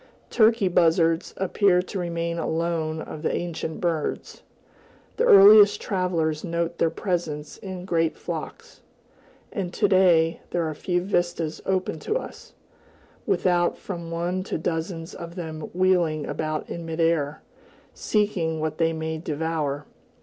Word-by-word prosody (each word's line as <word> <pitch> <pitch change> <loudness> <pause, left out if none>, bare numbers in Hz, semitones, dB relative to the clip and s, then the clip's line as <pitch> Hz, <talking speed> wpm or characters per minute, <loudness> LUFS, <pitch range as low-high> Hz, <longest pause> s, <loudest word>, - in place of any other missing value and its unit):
Turkey 220 -3 +4
buzzards 165 -1 +2
appear 190 -1 +3
to 185 +2 -4
remain 170 -1 -2
alone 160 -1 -1
of 155 - -8
the - - 0
ancient 165 -2 -4
birds; 165 -4 -2 0.8
the - - +2
earliest 205 - +8
travelers 170 -5 -1
note 170 0 -2
their 165 - +3
presence 160 -4 -3
in 185 -2 -7
great 165 -3 0
flocks, - - -7 0.7
and 185 -4 -3
to - - +3
day 175 -4 +4
there 175 - -1
are 155 - -3
few 175 +3 -1
vistas 175 -4 -1
open 185 -4 -1
to 425 - -2
us, - - -9 0.7
without 175 -2 +2
from 170 -4 -7
one 175 +2 -2
to 185 - -3
dozens 165 +1 -3
of 170 0 -8
them 160 -3 -6
wheeling 175 -4 +2
about 155 -1 -3
in 170 - -6
mid 165 0 -5
air, 160 -3 +1 0.5
seeking 185 -7 0
what 155 0 -3
they 165 0 +2
may 160 0 -3
devour. 155 -2 -2
170 Hz, 135 wpm, -25 LUFS, 160-185 Hz, 0.8 s, earliest